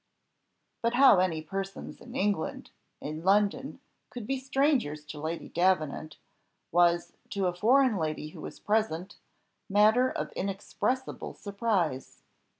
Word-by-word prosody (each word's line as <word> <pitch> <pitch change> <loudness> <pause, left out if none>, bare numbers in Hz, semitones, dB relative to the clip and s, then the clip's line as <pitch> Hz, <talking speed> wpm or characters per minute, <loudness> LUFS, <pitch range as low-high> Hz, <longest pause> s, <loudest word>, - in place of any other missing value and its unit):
But 235 +1 +1
how 265 -7 +7
any 165 -4 0
persons 195 +4 -6
in 245 +1 -11
England 205 -8 -1 0.3
in 155 +2 -6
London 205 +7 +2 0.3
could 240 -3 -7
be 270 +3 -1
strangers 265 - +1
to 150 0 -8
Lady 160 +2 -4
Davenant, 160 -4 0 0.5
was 175 0 +3 0.2
to 195 -1 -1
a 180 - +1
foreign 240 +4 +4
lady 155 -2 -2
who - - -11
was - - -8
present, 205 -3 -1 0.5
matter 215 +6 +5
of - - -4
inexpressible 200 +7 -3
surprise. 200 - -2
195 Hz, 125 wpm, -29 LUFS, 165-235 Hz, 0.5 s, how